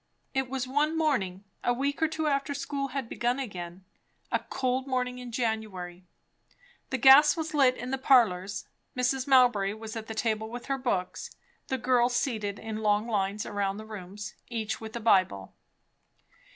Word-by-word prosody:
It 265 -2 0
was 260 -1 -2
one 300 +4 +1
morning 205 - 0 0.2
a 245 - +2
week 280 +4 -1
or 320 - +4
two 315 0 -3
after 280 -1 0
school 275 0 -3
had 270 -2 -4
begun 240 +3 -1
again; 185 -7 -6 0.5
a - - +2
cold 260 0 -2
morning 250 -1 -1
in 250 -1 -8
January. 210 -7 -3 0.8
The 260 - -1
gas 275 +5 +8
was 320 -1 -3
lit 265 -4 +4
in 245 +3 -5
the 265 - -1
parlours; 205 -7 +3 0.3
Mrs. 255 +1 0
Mowbray 245 -7 +4
was 220 +1 -8
at 220 -1 -6
the 225 - -6
table 220 -1 -1
with 240 +1 -7
her 275 -1 -1
books; 190 -8 -2 0.3
the 265 - -1
girls 245 0 +2
seated 215 -5 -1
in 220 -1 -5
long 210 0 +1
lines 205 -2 -1
around 200 -1 -2
the 215 - -8
rooms, 205 -1 -8 0.2
each 225 -3 -3
with 220 +1 -8
a - - -2
Bible. 185 - +2
240 Hz, 170 wpm, -28 LUFS, 210-265 Hz, 0.8 s, gas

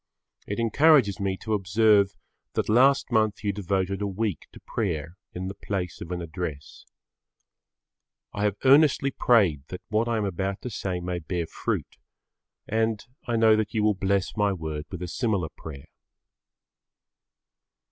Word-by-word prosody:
It 100 - -3
encourages 115 -2 +4
me 95 -1 -1
to 110 - -2
observe 100 +1 +3 0.4
that - - -1
last 130 +5 +4
month 110 -2 +1
you 100 -1 0
devoted 95 0 -1
a 100 - 0
week 100 -3 -3
to - - -13
prayer 85 -6 -3 0.2
in 90 +1 -4
the 95 - -4
place 95 -2 -4
of 85 - -7
an 90 -1 -3
address. 80 -3 -6 1.5
I 105 - -1
have 100 -2 +1
earnestly 140 0 +5
prayed 100 - +3
that 90 - -8
what 110 +2 +1
I 115 -1 0
am 105 - 0
about 95 +1 -2
to 125 - -5
say 95 -3 -3
may 90 0 -3
bear 85 +1 -3
fruit - - -4 0.7
and 110 -1 0 0.2
I 120 - 0
know 110 -1 +5
that 110 0 -2
you 110 - +2
will 105 0 +4
bless 95 0 -1
my 105 -1 +2
word 80 -4 -5
with 90 -2 -6
a - - -4
similar 100 -4 -1
prayer. 70 -4 -9
100 Hz, 155 wpm, -26 LUFS, 90-110 Hz, 1.5 s, earnestly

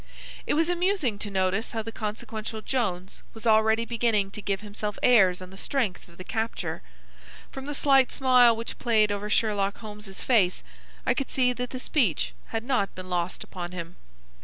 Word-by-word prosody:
It - - +2
was 325 +2 +3
amusing 350 - +1
to 210 - -3
notice 195 +4 0
how 225 -1 -2
the 225 - -6
consequential 220 0 -5
Jones 195 -8 -2
was 225 - -9
already 220 +1 +4
beginning 225 -4 +1
to 210 - -7
give 195 -1 -2
himself 210 0 -5
airs 190 -7 +5
on 185 - -11
the 195 - -9
strength 235 -9 -1
of 170 - -18
the 185 - -7
capture. 220 +4 -3 0.7
From 270 +1 -7
the 290 - -3
slight 270 -2 +4
smile 250 -3 +5
which 230 +1 -6
played 215 -3 +3
over 205 +1 -3
Sherlock 205 -2 +1
Holmes's 210 -3 -9
face, 200 -8 +3 0.4
I - - +3
could 275 - -3
see 250 -1 +2
that 245 0 -4
the 255 - -5
speech 250 - +1
had 225 -1 -3
not 245 -6 0
been 185 0 -8
lost 175 0 -1
upon 175 -1 -7
him. 170 -1 -6
220 Hz, 185 wpm, -27 LUFS, 195-245 Hz, 0.7 s, airs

